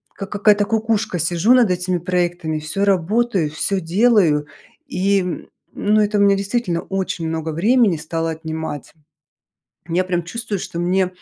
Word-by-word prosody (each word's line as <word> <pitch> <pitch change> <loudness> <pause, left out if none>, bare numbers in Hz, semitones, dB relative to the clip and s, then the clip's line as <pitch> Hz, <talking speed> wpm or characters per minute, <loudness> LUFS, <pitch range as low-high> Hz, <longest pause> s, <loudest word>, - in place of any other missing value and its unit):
как 195 -1 -7
какая-то 205 0 +3
кукушка, 220 -4 0
сижу 175 +8 +2
над 240 -6 +4
этими 180 0 -1
проектами, 175 -2 -1
всё 155 +6 -2
работаю, 195 -1 +1
всё 185 +6 -2
делаю, 175 -5 +3 0.4
и, 190 -5 -1 0.3
ну, 215 +1 +2
это 210 0 +1
у - - +3
меня 200 0 +5
действительно 195 -3 -1
очень 190 -3 -3
много 160 0 -3
времени 205 +3 +2
стало 165 +1 -3
отнимать. 160 -3 -6 0.9
Я 175 +2 +1
прям 175 -2 -2
чувствую, 225 +3 -4
что 170 - -6
мне 185 +2 +1
185 Hz, 145 wpm, -20 LUFS, 165-205 Hz, 0.9 s, меня